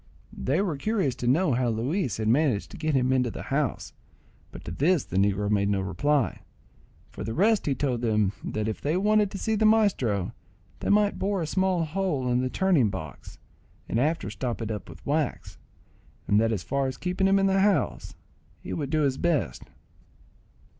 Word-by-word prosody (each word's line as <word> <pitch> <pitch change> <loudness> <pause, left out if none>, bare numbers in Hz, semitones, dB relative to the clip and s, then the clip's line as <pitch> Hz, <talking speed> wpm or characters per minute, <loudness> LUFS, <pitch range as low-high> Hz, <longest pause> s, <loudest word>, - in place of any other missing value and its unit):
They 155 +9 0
were 170 -8 -2
curious 195 - 0
to 120 - -3
know 150 +6 +3
how 120 0 +1
Luis 125 - -1
had 110 -1 -2
managed 125 -3 +1
to - - -9
get 155 -2 -1
him 130 0 +2
into 125 -2 +2
the - - -7
house; 140 -3 -1 0.6
but - - -11
to - - -5
this 150 - +2
the 90 - -5
negro 100 +1 +2
made 100 -1 +1
no 100 -1 +1
reply. 120 - 0 0.7
For - - -7
the 115 - -4
rest 210 +2 +2
he 140 - +1
told 125 -3 -1
them 105 -4 +1
that 110 0 -3
if 110 - -4
they 155 +5 0
wanted 210 +1 +3
to 195 - -6
see 220 +3 -1
the 220 0 +1
maestro, 135 - +2 0.5
they - - -3
might 205 0 +3
bore 195 -2 0
a - - -2
small 185 0 +1
hole 155 -7 -1
in 125 +1 +2
the 130 - -1
turning 170 - +2
box - - -8 0.5
and 115 - 0
afterwards 150 -7 0
stop 125 -3 -3
it 115 -1 -3
up 105 -4 -6
with 85 +1 -13
wax; 145 -1 -2 0.7
and 105 - +4
that 115 0 +2
as 100 -6 -2
for 140 -1 -1
keeping 180 +6 -1
him 195 0 +4
in 195 - +2
the 195 0 +3
house, 190 -7 +1 0.4
he - - -7
would 145 -4 -3
do 155 +1 +1
his 135 -2 0
best. 155 - -1
140 Hz, 195 wpm, -26 LUFS, 115-185 Hz, 0.7 s, and